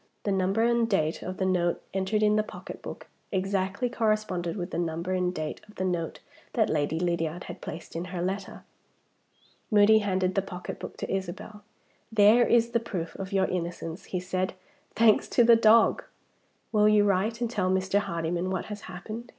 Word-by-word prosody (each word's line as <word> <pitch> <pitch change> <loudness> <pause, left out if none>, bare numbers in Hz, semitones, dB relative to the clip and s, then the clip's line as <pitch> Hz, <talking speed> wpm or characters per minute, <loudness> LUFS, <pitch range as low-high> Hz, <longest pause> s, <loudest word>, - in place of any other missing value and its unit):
The 205 - 0
number 195 +3 +1
and 235 -1 +2
date 160 -6 0
of 185 0 -5
the 190 - 0
note 175 -2 +1
entered 195 +3 0
in 210 0 +4
the 215 - +4
pocketbook 215 - -9 0.3
exactly 195 +3 0
corresponded 215 -7 -1
with 180 0 -4
the 170 - -2
number 170 +1 -2
and 180 -1 +1
date 155 -3 -5
of 210 - -16
the 185 - -2
note 175 -3 -2 0.3
that - - +2
Lady 155 +1 0
Lydiard 170 -1 -1
had - - -9
placed 165 0 -8
in 170 +2 -3
her 180 -1 -5
letter. 190 +3 -4 1.1
Moody 215 0 +6
handed 190 -3 0
the 195 - +2
pocketbook 180 -2 -7
to - - -5
Isabel. 195 +3 -6 0.5
"There 220 +3 +6
is 235 0 +3
the 235 - +2
proof 185 -8 -5
of 195 0 -6
your 195 -1 +2
innocence," 175 0 -4
he 185 - -3
said, 185 +1 -2 0.4
"thanks 220 -1 +4
to 240 - +4
the 235 0 +7
dog! 225 0 +5 0.7
Will 210 -1 +4
you 210 -1 +5
write 205 +3 +1
and 240 - 0
tell 200 -5 -1
Mr. 190 +1 +2
Hardyman 170 -1 -2
what 190 - -2
has 205 - -8
happened?" 215 +6 -7
190 Hz, 180 wpm, -27 LUFS, 180-215 Hz, 1.1 s, the